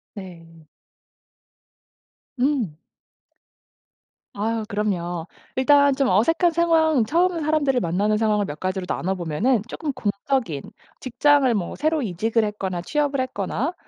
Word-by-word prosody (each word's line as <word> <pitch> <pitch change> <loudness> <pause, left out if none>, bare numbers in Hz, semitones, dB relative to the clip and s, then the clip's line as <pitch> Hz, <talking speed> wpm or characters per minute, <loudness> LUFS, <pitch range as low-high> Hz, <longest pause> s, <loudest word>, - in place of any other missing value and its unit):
네. 165 -5 -12 1.7
음. 250 - 0 1.6
아유 220 +2 -1
그럼요. 175 -5 -2 0.3
일단 285 +1 +4
좀 275 0 +1
어색한 330 - +3
상황 320 -5 +3
처음 340 +7 +1
사람들을 295 -4 +1
만나는 205 +2 0
상황을 210 -2 +1
몇 145 -2 -7
가지로 185 +1 -3
나눠 185 +1 -2
보면은 190 +7 0
쪼끔 300 +3 -4
공적인 205 - -2 0.4
직장을 270 0 +3
뭐 185 -5 -3
새로 310 0 0
이직을 220 +3 0
했거나 195 -4 -3
취업을 290 - -1
했거나 255 - -2
225 Hz, 255 characters per minute, -23 LUFS, 190-285 Hz, 1.7 s, 일단